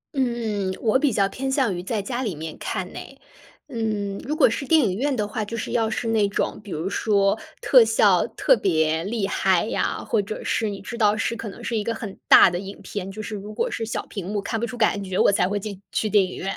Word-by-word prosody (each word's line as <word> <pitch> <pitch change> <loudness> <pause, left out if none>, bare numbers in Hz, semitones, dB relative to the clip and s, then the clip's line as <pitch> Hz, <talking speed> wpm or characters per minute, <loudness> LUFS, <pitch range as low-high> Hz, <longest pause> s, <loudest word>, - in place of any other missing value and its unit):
嗯， 225 -7 -1
我 235 +3 +2
比 290 -2 +2
较 200 -2 +2
偏 265 +6 -4
向 260 -8 +1
于 175 - -4
在 210 +4 -2
家 240 +5 -3
里 210 -10 -2
面 155 +1 -6
看 - - -3
哎。 - - -9 0.5
嗯， 210 -4 -2
如 300 - -1
果 310 - +6
是 230 - -3
电 320 - +5
影 190 -4 0
院 275 +3 0
的 210 -3 -1
话， 215 +1 -3
就 230 +3 -5
是 - - -4
要 225 -2 +1
是 230 +1 -2
那 215 -2 +3
种， 200 - -2
比 205 - -12
如 165 +2 -3
说 200 -1 +1 0.2
特 - - +7
效 - - +3
特 - - +3
别 160 - +1
厉 210 0 -1
害 190 -2 +2
呀， - - -2
或 220 - +1
者 205 +2 -6
是 220 -2 0
你 200 - -6
知 235 +4 -7
道 210 0 +3
是 230 +1 -1
可 230 - -6
能 - - -11
是 235 - -2
一 210 - -1
个 230 +1 -2
很 210 -6 -7
大 - - +9
的 175 - -2
影 195 +1 -8
片， 195 -1 -5
就 205 +3 -7
是， 215 0 -5
如 205 +1 -7
果 - - -1
是 225 - -3
小 - - -3
屏 195 -5 -7
幕 205 +1 -2
看 225 +3 -3
不 235 - -1
出 245 - -7
感 210 -3 +1
觉， 185 -1 -4
我 - - +5
才 180 -2 +2
会 205 - -1
进 200 -1 -7
去 220 - 0
电 205 -1 +5
影 185 - -5
院。 195 +1 -3
210 Hz, 275 characters per minute, -23 LUFS, 195-230 Hz, 0.5 s, 大